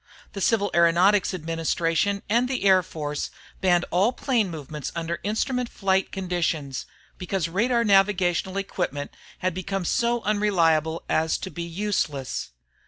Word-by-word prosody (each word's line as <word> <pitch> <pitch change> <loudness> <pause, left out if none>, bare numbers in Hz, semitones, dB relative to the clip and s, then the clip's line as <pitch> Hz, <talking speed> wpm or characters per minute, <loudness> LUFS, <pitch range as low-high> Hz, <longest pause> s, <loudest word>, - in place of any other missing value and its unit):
The 200 - -5
Civil 205 -1 +2
Aeronautics 175 +4 +4
Administration 165 +3 0
and 235 +4 +2
the 260 -5 -2
Air 190 -2 +6
Force 150 -4 -4 0.3
banned 175 -2 +3
all 195 +7 +3
plane 240 -7 0
movements 150 -3 -6
under 170 0 -3
instrument 240 +4 -1
flight 190 -1 0
conditions, 170 -7 -2 0.3
because 180 -2 -1
radar 235 +7 +1
navigational 195 -2 +2
equipment 175 -7 -3 0.3
had 185 - +2
become 185 +1 -3
so 235 +5 +1
unreliable 170 -7 +2
as 160 0 +1
to 190 - -7
be 170 - -6
useless. 170 -6 -2
185 Hz, 130 wpm, -25 LUFS, 165-205 Hz, 0.3 s, Air